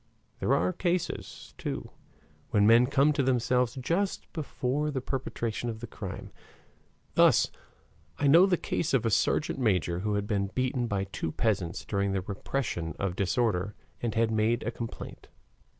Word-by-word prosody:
There - - +2
are 90 +2 +1
cases, 175 -1 -3
too, - - -4 0.6
when 100 -1 +3
men 115 +3 +6
come 145 +2 +3
to 145 - +1
themselves 125 -1 +1
just 170 +9 -2
before 150 -2 -1
the 140 -3 -2
perpetration 120 -3 -3
of 110 -1 -5
the 120 - -6
crime. - - -7 0.8
Thus - - +5 0.7
I 145 - 0
know 165 +7 +7
the 180 -2 +2
case 165 -2 -1
of 120 -3 +1
a 115 - +2
sergeant 150 +6 +1
major 90 -7 +1
who 105 +2 -1
had 100 0 -1
been 100 -2 0
beaten 130 -1 0
by 100 -3 -1
two 95 -4 -4
peasants 95 -6 -1
during 100 -1 0
the 95 - 0
repression 95 - -3
of 95 -2 -2
disorder 100 -1 0 0.3
and 115 -3 -2
had 115 0 +2
made 110 +2 +1
a 115 - -2
complaint. 115 -1 -7
115 Hz, 160 wpm, -29 LUFS, 100-135 Hz, 0.8 s, know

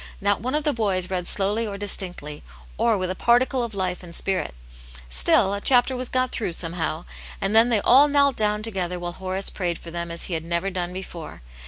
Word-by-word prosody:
Not 205 0 +1
one 255 +5 -1
of 305 - 0
the 295 -1 +1
boys 190 -5 -1
read 180 -2 -2
slowly 210 +3 0
or 200 -1 -5
distinctly, 180 -7 -3 0.3
or 230 -3 +2
with 185 -1 -1
a - - -4
particle 245 +4 +2
of 235 -2 -4
lifef 185 -2 -2
and 170 -2 -6
spirit; 190 - -1 0.6
still, 60 - +3
a 200 - -3
efhapter 255 +2 +5
was 255 0 -2
got 255 0 +1
through, 210 -7 -2
somehow, 165 -1 -3 0.3
and 195 +2 0
then 225 +2 +6
they 220 -4 +2
all 275 +4 +6
knelt 280 -2 +3
down 210 0 0
together 185 -5 -2
while 175 0 -4
Horace 190 +1 -3
prayed 175 -3 -2
for 170 - -11
them 170 0 -4
as 170 0 -2
he 180 - -4
had 160 -1 -2
never 170 +3 -1
done 180 -1 -3
before. 175 - -8
195 Hz, 215 wpm, -24 LUFS, 175-230 Hz, 0.6 s, then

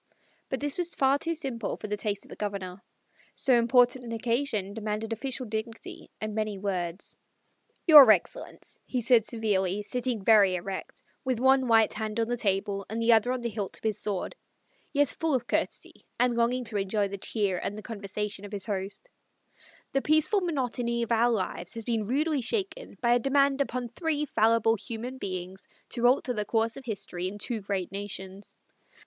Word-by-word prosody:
But 265 - -2
this 290 +3 0
was 345 -1 -1
far 275 +1 +3
too 335 +2 -1
simple 255 -8 -3
for - - -8
the 210 - -1
taste 205 -1 -3
of - - -17
a - - -7
Governor. 195 -3 -5 0.5
So 260 - +4
important 245 +1 +4
an 235 - -7
occasion 230 -3 -1
demanded 215 +1 -3
official 260 +2 -2
dignity 220 +1 -6
and 215 0 -4
many 215 -1 -2
words. 185 -2 -3 0.7
"Your 295 -7 +10
excellency," 215 - 0
he 255 - -2
said 235 -2 +4
severely, 205 -4 0
sitting 245 -2 -2
very 205 -4 +6
erect, 190 +2 -6 0.2
with 255 -4 -1
one 265 0 +4
white 225 -2 +4
hand 215 0 -3
on 225 - +1
the 245 - 0
table 200 -2 0
and 220 +2 -3
the 230 +1 +5
other 225 +2 +3
on 255 -1 -2
the 235 - -2
hilt 205 -3 -4
of - - -21
his 220 -2 0
sword 200 -3 -2 0.6
(yet 285 -2 +3
full 320 -3 0
of 250 - -1
courtesy, - - -3 0.2
and 245 -1 +3
longing 240 +2 +1
to 220 -3 -3
enjoy 200 +1 0
the 200 0 -7
cheer 195 -3 -1
and 210 +1 -5
conversation 205 -1 -5
of 205 - -9
his 200 -2 -4
host); 200 - -4 0.9
"the 275 - +2
peaceful 310 +8 +3
monotony 245 -7 -1
of 235 - -5
our 230 +1 +4
lives 190 -5 -2
has 225 -1 -6
been 225 -4 -1
rudely 295 +3 +1
shaken 420 - -3
by 240 0 +4
a 245 - +4
demand 275 +2 +2
upon 250 -2 -2
three 300 +4 -1
fallible 225 -3 +3
human 235 +3 -6
beings 185 -1 -5 0.2
to 240 0 +2
alter 255 0 +2
the 210 -2 -1
course 225 +2 0
of 270 - -10
history 185 -5 -3
in 200 +2 -6
two 220 +1 -3
great 195 -3 -3
nations. 195 0 -7
225 Hz, 185 wpm, -28 LUFS, 205-255 Hz, 0.9 s, Your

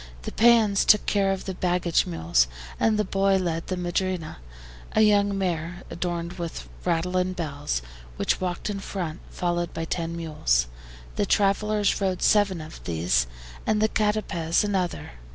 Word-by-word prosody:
The - - -4
PEONS 225 -4 +5
took 210 - +5
care 195 -1 +2
of 190 -1 -3
the 190 - -3
baggage 175 -1 +1
mules, 80 -8 +2 0.3
and 220 -1 +3
the 210 - +2
boy 195 0 +2
led 170 -3 -1
the 185 - -2
MADRINA, 180 -1 -2 0.6
a 215 - +4
young 205 -2 +4
mare 175 -2 -2
adorned 170 0 -3
with 170 -1 -5 0.2
rattle 180 +1 0
and 185 0 0
bells, 145 - -3 0.3
which - - 0
walked 180 -2 -2
in 200 - -4
front, 175 -5 -4
followed 175 -1 -2
by 165 - -2
ten 165 0 -3
mules. 60 - +1 0.5
The - - +1
travelers 205 +1 +2
rode 190 -2 0
seven 200 -5 +3
of 155 0 -10
these, 80 -7 +1 0.4
and 215 -1 +2
the 215 +1 +3
CATAPEZ 210 -6 +1
another. 190 - -2
180 Hz, 155 wpm, -25 LUFS, 165-200 Hz, 0.6 s, PEONS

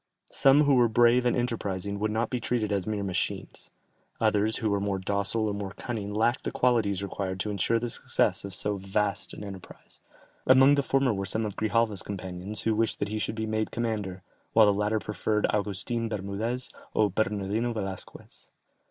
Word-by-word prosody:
Some 140 +2 +5
who 140 -1 +4
were 120 -2 +5
brave 120 +2 +4
and 120 - +1
enterprising 100 -5 -2
would 110 +1 0
not 110 +1 -1
be 125 - -1
treated 115 -2 -1
as 100 -1 -1
mere 105 -2 -1
machines; 95 -3 -3 0.5
others 110 0 +2
who 110 -4 -1
were 100 - +1
more 100 -1 -1
docile 100 +3 0
or 105 - -1
more 100 -1 -5
cunning 105 -4 -4
lacked 115 +4 +1
the - - -2
qualities 110 -6 +1
required 95 -1 -4
to 105 - -2
insure 100 +3 +1
the 120 +1 -2
success 115 - 0
of 100 -2 -4
so 105 +1 -1
vast 100 +1 -1
an - - -8
enterprise; 95 -3 -11 0.5
among 130 +2 +7
the 145 - +3
former 135 -2 +2
were 100 -1 -3
some 110 +4 0
of 105 -2 -4
Grijalva's 110 -3 +1
companions 95 +1 -5
who 110 - +2
wished 110 +1 0
that 100 - -2
he 110 0 -2
should 110 - -2
be 110 0 -2
made 110 0 -1
commander, 105 -5 -3 0.3
while 110 -1 +7
the 105 - +4
latter 105 +2 0
preferred 105 0 -1
Augustin 105 +3 -2
Bermudez 110 +5 -3 0.2
or 105 -3 +3
Bernardino 105 +3 -1
Velasquez. 95 -4 -7
105 Hz, 185 wpm, -28 LUFS, 100-115 Hz, 0.5 s, among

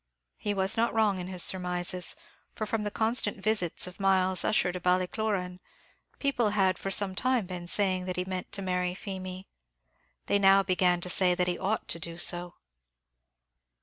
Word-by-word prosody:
He 205 -1 -2
was 190 +2 +1
not 230 +1 +1
wrong 210 -4 +2
in 180 - -5
his 185 -2 +1
surmises; 180 0 0 0.4
for, 215 - -3
from 215 0 -2
the 210 - -2
constant 225 +3 0
visits 200 -4 0
of 180 +2 -11
Myles 190 -1 +2
Ussher 215 -4 +2
to 180 - -5
Ballycloran, 180 +1 -1 0.6
people 255 -6 0
had 190 -2 +2
for 195 - -4
some 195 0 0
time 255 +1 0
been 180 -1 -7
saying 185 -1 +1
that 185 -1 -4
he 180 - -1
meant 185 -1 -5
to 200 - -2
marry 180 -1 -1
Feemy. 185 -1 -7 0.8
They 200 - +1
now 195 0 +5
began 180 -2 +2
to 180 - -5
say 180 -1 +4
that 180 - +1
he 180 -1 -2
ought 215 +3 -2
to 170 - -1
do 165 0 -7
so. 175 0 +2
185 Hz, 180 wpm, -28 LUFS, 180-205 Hz, 0.8 s, now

